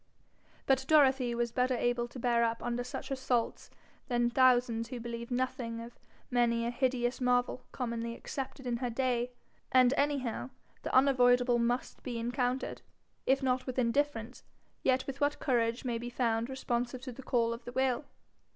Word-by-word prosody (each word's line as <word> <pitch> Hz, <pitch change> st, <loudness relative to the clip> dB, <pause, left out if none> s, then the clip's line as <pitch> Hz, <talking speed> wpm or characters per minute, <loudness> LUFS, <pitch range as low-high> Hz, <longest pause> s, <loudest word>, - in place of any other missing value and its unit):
But 265 Hz, -1 st, +3 dB
Dorothy 265 Hz, -5 st, +4 dB
was 235 Hz, 0 st, -1 dB
better 250 Hz, +1 st, +1 dB
able 240 Hz, 0 st, 0 dB
to 240 Hz, -, -11 dB
bear 235 Hz, -1 st, +2 dB
up 230 Hz, 0 st, -1 dB
under 240 Hz, 0 st, -1 dB
such 245 Hz, -, -6 dB
assaults 255 Hz, -3 st, -1 dB, 0.4 s
than 240 Hz, -1 st, +1 dB
thousands 245 Hz, -3 st, +3 dB
who 245 Hz, +1 st, -6 dB
believe 235 Hz, 0 st, -6 dB
nothing 245 Hz, -2 st, -2 dB
of 235 Hz, +1 st, -10 dB, 0.3 s
many 235 Hz, -1 st, +2 dB
a 235 Hz, -, -1 dB
hideous 245 Hz, 0 st, 0 dB
marvel 250 Hz, 0 st, +1 dB
commonly 235 Hz, -2 st, -3 dB
accepted 270 Hz, +1 st, -6 dB
in 240 Hz, -1 st, 0 dB
her 245 Hz, 0 st, -2 dB
day; 245 Hz, 0 st, 0 dB, 0.4 s
and 255 Hz, -1 st, +6 dB
anyhow 275 Hz, -4 st, -1 dB, 0.3 s
the -, -, -4 dB
unavoidable 245 Hz, -2 st, +5 dB
must 240 Hz, +2 st, -1 dB
be 245 Hz, -3 st, -4 dB
encountered, 245 Hz, +2 st, -1 dB, 0.5 s
if 270 Hz, +1 st, +3 dB
not 255 Hz, 0 st, 0 dB
with 255 Hz, -, -4 dB
indifference, 250 Hz, -1 st, 0 dB, 0.4 s
yet 260 Hz, 0 st, +2 dB
with 275 Hz, +1 st, -6 dB
what 290 Hz, +1 st, +2 dB
courage 235 Hz, -2 st, 0 dB
may 235 Hz, -2 st, -1 dB
be 240 Hz, +1 st, -5 dB
found 235 Hz, -1 st, 0 dB
responsive 250 Hz, -1 st, -2 dB
to 260 Hz, -, -5 dB
the 245 Hz, -, -10 dB
call 235 Hz, -3 st, +1 dB
of 235 Hz, +1 st, -8 dB
the 245 Hz, -, -6 dB
will. 260 Hz, +2 st, 0 dB
245 Hz, 165 wpm, -31 LUFS, 235-260 Hz, 0.5 s, and